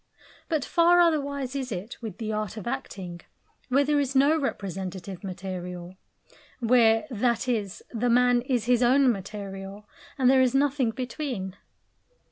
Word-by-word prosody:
But 310 Hz, -6 st, 0 dB
far 345 Hz, +1 st, +4 dB
otherwise 280 Hz, -5 st, +1 dB
is 260 Hz, -3 st, -3 dB
it 200 Hz, +6 st, -6 dB
with 215 Hz, -5 st, -6 dB
the 220 Hz, -1 st, -3 dB
art 215 Hz, 0 st, -3 dB
of 215 Hz, -, -7 dB
acting, 190 Hz, -9 st, -5 dB, 0.5 s
where 275 Hz, +3 st, +4 dB
there 295 Hz, +1 st, +2 dB
is 275 Hz, -1 st, -1 dB
no 280 Hz, +4 st, +5 dB
representative 190 Hz, -, -4 dB
material; 180 Hz, -1 st, -6 dB, 0.6 s
where, 230 Hz, -1 st, +4 dB
that 235 Hz, +1 st, 0 dB
is, 210 Hz, -5 st, -2 dB
the 240 Hz, +1 st, 0 dB
man 245 Hz, 0 st, +4 dB
is 245 Hz, -3 st, -1 dB
his 245 Hz, 0 st, +3 dB
own 260 Hz, +1 st, +5 dB
material, 195 Hz, 0 st, -7 dB, 0.3 s
and 260 Hz, -2 st, +3 dB
there 260 Hz, 0 st, +6 dB
is 255 Hz, 0 st, +2 dB
nothing 275 Hz, -3 st, +2 dB
between. 245 Hz, -, -4 dB
240 Hz, 145 wpm, -26 LUFS, 195-270 Hz, 0.6 s, there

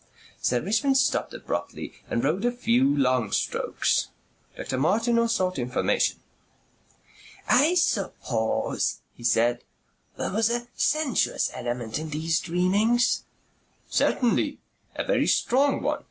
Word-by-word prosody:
Sir 125 Hz, -1 st, +1 dB
Richmond 220 Hz, +8 st, +1 dB
stopped 265 Hz, -, +1 dB
abruptly -, -, -5 dB, 0.2 s
and 115 Hz, -, -1 dB
rowed 165 Hz, +9 st, 0 dB
a 245 Hz, -, +2 dB
few 140 Hz, -, +2 dB
long 130 Hz, -3 st, +1 dB
strokes. -, -, 0 dB, 0.5 s
Dr. 130 Hz, -1 st, -3 dB
Martineau 230 Hz, -, +2 dB
sought 185 Hz, -, 0 dB
information. 125 Hz, +1 st, 0 dB, 1.3 s
"I 310 Hz, +7 st, +4 dB
suppose," 130 Hz, -, -1 dB
he 120 Hz, -, -15 dB
said, 120 Hz, 0 st, +2 dB, 0.5 s
"there -, -, -2 dB
was 220 Hz, +2 st, +2 dB
a 240 Hz, 0 st, -2 dB
sensuous 305 Hz, -4 st, +1 dB
element 120 Hz, +1 st, -4 dB
in 155 Hz, 0 st, -6 dB
these 160 Hz, +2 st, 0 dB
dreamings?" 200 Hz, +8 st, +1 dB, 0.6 s
"Certainly. 245 Hz, -2 st, +1 dB, 0.4 s
A -, -, -2 dB
very -, -, +1 dB
strong 275 Hz, +3 st, +2 dB
one. -, -, 0 dB
185 Hz, 115 wpm, -26 LUFS, -, 1.3 s, I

